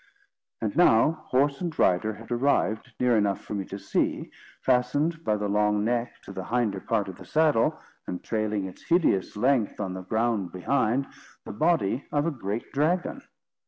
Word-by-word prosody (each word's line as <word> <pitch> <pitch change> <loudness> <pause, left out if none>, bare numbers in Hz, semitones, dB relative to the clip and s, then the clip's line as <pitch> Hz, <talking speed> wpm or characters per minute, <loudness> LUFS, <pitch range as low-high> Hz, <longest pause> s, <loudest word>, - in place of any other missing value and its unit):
And 110 -2 -2
now 150 -5 +5 0.2
horse 140 +3 +2
and 170 -3 -3
rider 105 +4 +2
had 115 +2 -13
arrived 120 -2 +1
near 125 -1 +3
enough 100 -2 +1
for - - -8
me 100 -2 -2
to 100 - -7
see, - - -1 0.3
fastened 145 +6 +1
by 105 - +1
the 105 0 -2
long 105 0 +2
neck 120 +1 -1
to - - -10
the 95 -1 -6
hinder 115 -5 0
part 105 0 -1
of 95 -2 -8
the - - -11
saddle, 155 -7 +2 0.3
and 90 - -5
trailing 105 -3 -1
its 95 - -9
hideous 165 - +1
length 125 -1 +1
on 95 -3 -3
the 95 - -5
ground 110 -1 -1
behind, 125 +6 +1 0.4
the - - -6
body 125 - +1
of 145 0 +1
a 170 - +1
great 115 -5 -5
dragon. 175 - 0
115 Hz, 175 wpm, -27 LUFS, 105-140 Hz, 0.4 s, now